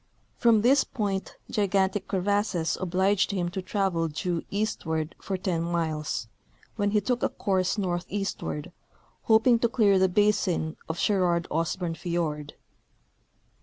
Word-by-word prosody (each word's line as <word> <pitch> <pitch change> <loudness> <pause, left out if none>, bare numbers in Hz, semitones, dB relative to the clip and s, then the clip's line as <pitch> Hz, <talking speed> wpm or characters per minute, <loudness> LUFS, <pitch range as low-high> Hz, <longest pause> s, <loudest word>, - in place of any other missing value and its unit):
From 225 -3 +4
this 265 +4 +5
point 200 -4 -3 0.2
gigantic 195 -1 +1
crevasses 195 -3 0
obliged 190 +2 +2
him 180 -3 -1
to 190 +2 -4
travel 185 -3 0
due 165 +2 -2
eastward 160 -6 -2
for 195 - -3
ten 180 -3 -1
miles, 160 -7 -2 0.5
when 205 -2 +1
he 210 +1 +3
took 245 +4 -1
a - - +2
course 190 0 0
northeastward, 175 - -3 0.5
hoping 230 +2 +5
to 235 - +2
clear 205 -5 +4
the 190 0 +4
basin 185 -5 +1
of 160 - -3
Sherard 175 -4 +1
Osborne 165 +2 -1
fiord. 165 -3 -3
190 Hz, 130 wpm, -27 LUFS, 170-205 Hz, 0.5 s, this